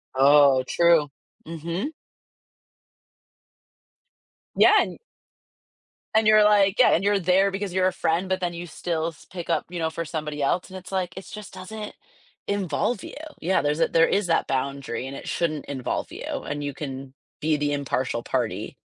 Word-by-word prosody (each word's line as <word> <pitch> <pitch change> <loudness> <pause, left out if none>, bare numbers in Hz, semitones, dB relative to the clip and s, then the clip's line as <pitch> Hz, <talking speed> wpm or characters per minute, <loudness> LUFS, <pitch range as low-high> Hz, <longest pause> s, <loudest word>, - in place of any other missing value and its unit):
Oh, 140 -1 +6
true. 170 -3 +4 0.4
Mhm. 170 - -4 2.6
Yeah, - - +6
and - - -4 1.1
And 220 0 +3
you're 215 0 +7
like, 205 -2 +4
yeah, 255 - +7
and 180 - +2
you're 205 0 +3
there 190 +2 +3
because 195 -1 -4
you're 185 0 +3
a 185 - 0
friend, 170 +2 0
but 185 0 0
then 175 -1 -1
you 175 +1 -6
still 160 0 -2
s 165 -2 -9
pick 175 -2 -7
up, 165 -2 +1
you 175 -1 -5
know, 160 -1 0
for 165 +1 -4
somebody 150 -2 -4
else, 175 +7 0
and 190 - -8
it's 185 - -11
like, 185 -3 -2
it 190 - -7
just 210 -3 -9
doesn't 210 +3 -7 0.5
involve 200 +2 -1
you. - - -8 0.3
Yeah, 185 +3 +1
there's 150 +2 0
a - - +4
there 165 0 +4
is 200 -1 +1
that 165 - +1
boundary, 135 -2 -2
and 135 - -7
it - - -9
shouldn't 155 -4 -1
involve 130 -3 -3
you, - - -7 0.2
and 145 0 -4
you 145 -1 -3
can 135 -2 -7 0.3
be 155 0 +2
the 145 0 0
impartial 130 -4 -2
party, - - -2
170 Hz, 175 wpm, -25 LUFS, 145-190 Hz, 2.6 s, you're